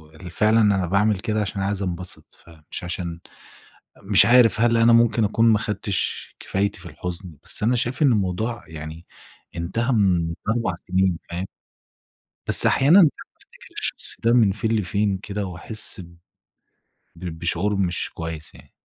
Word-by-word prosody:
ال 90 +2 -10
فعلًا 110 +5 +3
أنا 100 -3 +2
باعمل 100 +2 +2
كده 105 +2 -1
عشان 100 - -4
أنا 95 - -1
عايز 100 0 -2
انبسط، 90 0 -5
فمش 80 -3 -10
عشان 85 -1 -5 0.8
مش 100 -1 +5
عارف 120 -3 +5
هل 115 0 +3
أنا 115 +1 +5
ممكن 115 -1 +4
اكون 105 +2 +1
ما 110 - +4
اخدتش 105 -1 -3
كفايتي 100 +1 -2
في 90 - -14
الحزن، 90 -3 -7
بس - - -3
أنا 120 +3 +2
شايف 120 +3 -2
إن 140 - +5
الموضوع 110 +3 -1
يعني 80 +1 -9 0.5
انتهى 95 +9 -2
من 90 -6 +1 0.2
4 115 -5 0
سنين، 95 0 0
فاهم؟ 85 +2 -4 1.0
بس - - +6
أحيانًا 150 +9 +5
بافتكر 150 -6 -3
الشخص - - -1
ده 115 +1 +3
من 110 -5 +4
فين 110 +3 -2
لفين 100 -1 0
كده 100 +1 -5
واحس 95 +3 -4
ب 85 -1 -15 1.0
ب 85 -1 -7
بشعور 90 +4 -1
مش 90 -3 -1
كويس 80 -1 -7
يعني. - - -17
100 Hz, 155 wpm, -22 LUFS, 90-110 Hz, 1.0 s, بس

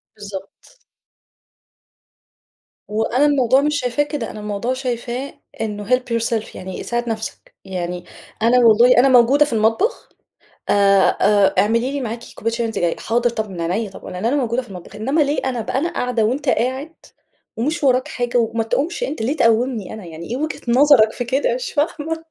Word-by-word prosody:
بالضبط. 205 - -10 2.1
وأنا 225 +6 +1
الموضوع 270 -2 +3
مش 295 0 0
شايفاه 250 +3 0
كده، 290 -6 -5
أنا 215 - -9
الموضوع 210 +4 -2
شايفاه 255 +1 -4 0.3
إنه 210 -2 -4
help 250 0 +4 0.2
yourself 225 -1 -2
يعني 185 0 -7
ساعد 240 0 -2
نفسك، 220 -1 -6
يعني 180 -2 -4 0.4
أنا 235 +3 +4
والله 235 +1 +6
أنا 260 +3 +6
موجودة 260 +4 +5
في 280 - -5
المطبخ 225 - +1 0.6
آآ، - - +4 0.5
آآ، 205 0 +4
اعملي 230 +5 +2
لي 285 0 -3
معاكِ 230 -1 -5
كوباية 230 +1 -2
شاي 235 0 -1
وأنتِ 225 - -3
جاية، 170 -1 0
حاضر 240 +2 0
طَب 220 -2 -4
من 180 -3 -6
عينيّا، 215 +2 -1
طب 190 - -13
لأن 180 +2 -5
أنا 245 +5 +2
موجودة 250 -3 0
في 245 - -16
المطبخ، 185 +1 -10
إنّما 270 +9 0
ليه 290 +1 +1
أنا 250 -3 -1
بقى 225 - -3
أنا 325 +6 0
قاعدة 245 -3 0
وأنت 265 +5 -1
قاعد، 260 +7 -1 0.6
ومش 300 +8 -1
وراك 255 -2 +3
حاجة، 245 0 -2
وما 230 -1 +1
تقومش 320 - -1
أنت، 310 - -3
ليه 275 +8 -1
تقوّمني 230 -2 +1
أنا، 215 -3 -9
يعني 165 0 -9
إيه 245 - -2
وجهة 310 +2 -4
نظرك 245 -3 +5
في 245 - -3
كده 280 - 0
مش - - -4
فاهمة! 320 +2 -2
240 Hz, 180 wpm, -20 LUFS, 220-270 Hz, 2.1 s, والله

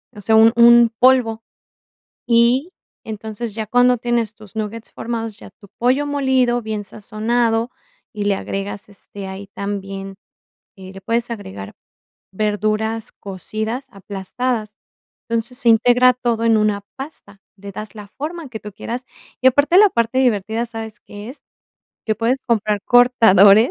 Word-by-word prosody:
o 205 - -9
sea, 220 +3 +2
un 225 +1 +6
un 235 0 +7
polvo. 250 -3 +4 0.9
Y, 245 +8 +3 0.3
entonces, 220 0 -6
ya 220 -1 -4
cuando 245 +2 +3
tienes 235 -2 -1
tus 215 0 -16
nuggets 220 +1 -5
formados, 225 -2 -4
ya - - -12
tu 200 - -16
pollo 260 +5 +2
molido, 265 -4 +1
bien 215 -1 -4
sazonado, 225 +3 -1 0.4
y 210 -2 -4
le 205 -1 +2
agregas, 195 +1 -5
este, 200 -1 -11
ahí 190 +1 -8
también, 195 -1 -5 0.6
eh, 190 -2 -11
le 195 - -10
puedes 235 +3 -1
agregar 100 - -7 0.6
verduras 215 +2 -1
cocidas 220 +6 -5
aplastadas. 210 +3 -4 0.5
Entonces, 230 +2 -3
se 250 - +1
integra 245 +3 +5
todo 235 -2 -2
en 225 -1 +4
una 210 -1 +1
pasta, 265 -8 -10 0.2
le 200 0 -10
das 215 0 -7
la 210 - -9
forma 315 +1 -5
que 220 -3 -8
tú 210 -1 -9
quieras 240 +5 -6 0.4
y, 260 - +6
aparte, 285 +7 +4
la 420 0 +8
parte 235 0 0
divertida, 225 -2 +1
¿sabes 225 -2 -8
qué 205 +3 -10
es? 275 - -13 0.7
Que 215 - +1
puedes 230 +5 0
comprar 215 -3 0
cortadores 225 -3 +6
225 Hz, 145 wpm, -19 LUFS, 205-245 Hz, 0.9 s, la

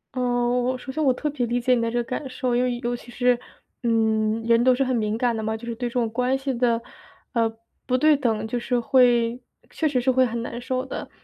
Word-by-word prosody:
嗯， 245 0 +1
我 255 +1 0
首 265 - -7
先 310 +3 -2
我 270 - +4
特 300 - -3
别 260 -4 -2
理 240 +1 0
解 250 +1 +2
你 240 - +2
的 230 - 0
这 240 - -2
个 240 - +1
感 260 +3 -5
受， 255 -1 -1
因 245 - +2
为 250 -1 0
尤 240 +1 -1
其 240 - -12
是 245 0 +2 0.4
嗯， 220 -1 +1
人 230 0 +4
都 255 0 +5
是 270 - +1
很 260 -1 0
敏 215 -1 0
感 240 0 +1
的 220 - -3
嘛， 220 0 -2
就 235 - -10
是 235 - -4
对 240 +1 -3
这 - - -14
种 240 -2 +1
关 250 +3 0
系 270 -1 -3
的， 235 -1 +1 0.5
呃， 230 -2 +2 0.4
不 255 - +2
对 305 +2 +5
等， 225 -5 -1
就 240 +2 -2
是 245 +1 0
会 240 -1 +3 0.3
确 315 - 0
实 265 -3 +1
是 255 +2 +2
会 260 0 +4
很 235 -1 -3
难 240 +1 -6
受 255 +1 -2
的。 265 - -6
245 Hz, 280 characters per minute, -24 LUFS, 230-255 Hz, 0.5 s, 都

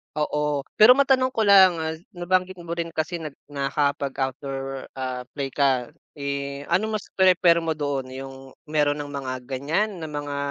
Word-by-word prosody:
Oo 150 -1 -1 0.2
pero 230 +4 +9
matanong 265 -2 +3
ko 225 - 0
lang. 195 -3 +7
Ah, 160 0 -3 0.2
nabanggit 185 +1 0
mo 170 -1 -8
rin 170 -1 -3
kasi 160 +2 -2
na 155 -3 -6 0.2
nakapag-outdoor 135 -1 -2
ah, 130 -1 -4
play 140 -1 -2
ka. 130 -3 +1 0.2
Eh, 140 -1 -4
ano 215 +5 +1
mas 210 - -6
prefer 180 -2 +4
mo 165 -1 -2
doon, 145 -3 -2
yung 135 0 -7 0.3
meron 150 -1 +2
ng 145 0 -7
mga 135 -2 -4
ganyan? 140 - -1
Na 160 - -5
mga 145 -1 -4
150 Hz, 160 wpm, -24 LUFS, 140-175 Hz, 0.3 s, pero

